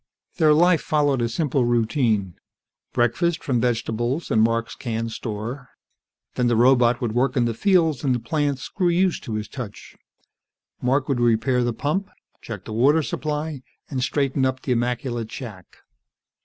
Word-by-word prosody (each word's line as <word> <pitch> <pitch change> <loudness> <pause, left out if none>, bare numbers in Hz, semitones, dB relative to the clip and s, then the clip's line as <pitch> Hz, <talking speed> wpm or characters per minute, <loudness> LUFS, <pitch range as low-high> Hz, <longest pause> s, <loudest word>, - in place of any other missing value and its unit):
Their 155 -4 +5
life 175 +1 +4
followed 145 -4 +1
a 115 - 0
simple 135 +1 0
routine. 115 - +1 0.6
Breakfast, 160 +9 +1
from 125 -4 0
vegetables 120 +4 -1
and 110 - +4
Mark's 115 +1 +1
canned 115 -2 -3
store. 115 +4 -5 0.6
Then 125 - +1
the 120 - +2
robot 120 +1 +4
would 120 -3 -1
work 125 +3 +1
in 120 - +3
the 115 - 0
fields, 165 - +2
and 130 -3 +2
the - - -2
plants 140 +2 -1
grew 180 -3 0
used 180 +1 +1
to 110 - -4
his 105 -1 -3
touch. 110 -2 -8 0.9
Mark 130 +2 +1
would 135 -3 0
repair 120 +2 +2
the 120 - 0
pump, 170 - -2 0.3
check 110 -5 -8
the 110 - -6
water 145 +8 +4
supply, 150 -1 -3 0.3
and 130 -2 -2
straighten 135 +1 0
up 130 0 -1
the 130 - -2
immaculate 120 -1 -1
shack. 105 -9 -8
125 Hz, 160 wpm, -23 LUFS, 115-145 Hz, 0.9 s, Their